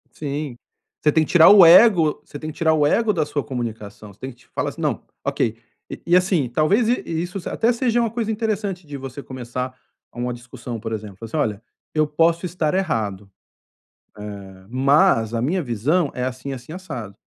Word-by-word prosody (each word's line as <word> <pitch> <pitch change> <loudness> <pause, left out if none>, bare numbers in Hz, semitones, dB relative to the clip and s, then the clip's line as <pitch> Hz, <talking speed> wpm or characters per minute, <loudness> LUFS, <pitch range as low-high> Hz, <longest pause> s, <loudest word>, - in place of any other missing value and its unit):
Sim. 145 -3 -4 0.5
Você 150 - +4
tem 160 +1 +3
que - - -10
tirar 170 -2 +8
o 200 -3 +9
ego 170 -3 +6
você 145 - -9
tem 155 +1 -6
que 155 - -12
tirar 160 -1 +3
o 150 -2 +3
ego 225 +7 +2
da 160 -5 0
sua 145 -1 -2
comunicação, 110 -5 -6
você 95 - -24
tem 130 - -5
que 120 - -24
te - - -23
falar - - -2
assim: - - -11
"Não, - - -1 0.2
ok". 110 0 -1 0.3
E - - -8
e, 175 +1 +5
assim, 180 -7 +2
talvez 160 - +2
i 245 - +2
isso 175 +4 -3
se - - -6
até 230 +2 +1
seja 240 0 +1
uma 230 -1 +1
coisa 230 -1 -2
interessante 210 -5 -2
de 145 -1 -7
você 135 0 -8
começar 130 0 -5 0.4
uma 120 +1 -3
discussão, 120 -1 -8
por 110 - -5
exemplo, 105 -3 -6
assim: 115 - -5
"Olha, 105 -1 -1 0.3
eu 155 -1 +3
posso 165 +3 +1
estar 165 -3 -1
errado, 105 - -2 0.9
eh, 100 -2 -9
mas 130 - +3
a 115 - -1
minha 175 +8 0
visão 140 - 0
é 125 - -2
assim, 130 +2 -5
assim, 130 +3 -8
assado". 130 - -7
145 Hz, 200 wpm, -22 LUFS, 120-180 Hz, 0.9 s, o